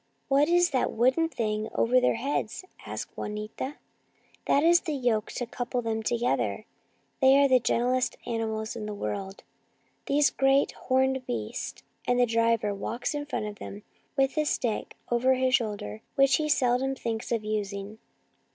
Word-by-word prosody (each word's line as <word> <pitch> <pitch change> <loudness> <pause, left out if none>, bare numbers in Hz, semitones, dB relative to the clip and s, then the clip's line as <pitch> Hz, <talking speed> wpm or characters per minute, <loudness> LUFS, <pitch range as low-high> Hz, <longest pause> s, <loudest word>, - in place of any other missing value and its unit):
" - - -45
What 280 +3 +4
is 350 0 +4
that 255 - +1
wooden 260 +8 +2
thing 215 -6 -2
over 250 +2 +3
their 250 - +3
heads? 260 +5 -2
" - - -16
asked - - -6
Juanita. 215 +6 -5 0.4
" - - -34
That 285 - +4
is 345 +1 +6
the 310 -4 -3
yoke 240 -5 0
to 245 - -3
couple 245 +1 -3
them 225 -1 -1
together. 235 +2 0 0.5
They 265 0 +6
are 280 0 +6
the 260 -1 +5
gentlest 250 +2 +1
animals 220 -1 -2
in 215 -2 -5
the 210 - -4
world, 190 - -5 0.6
these 285 +1 +3
great, 270 +1 +3
horned 260 0 0
beasts, 110 -3 -4 0.2
and 245 0 +2
the 245 - +6
driver 230 -2 +1
walks 230 +7 -3
in 290 0 -4
front 265 - -2
of 210 -1 -7
them 205 +1 -8 0.3
with 270 0 +2
a 305 - +2
stick 235 -6 -1 0.2
over 255 +2 +3
his 255 0 +1
shoulder, 205 - -1
which 275 0 +5
he 305 -1 -1
seldom 265 -1 +2
thinks 230 -3 -4
of 230 -2 0
using." 210 0 -4
245 Hz, 170 wpm, -28 LUFS, 220-270 Hz, 0.6 s, is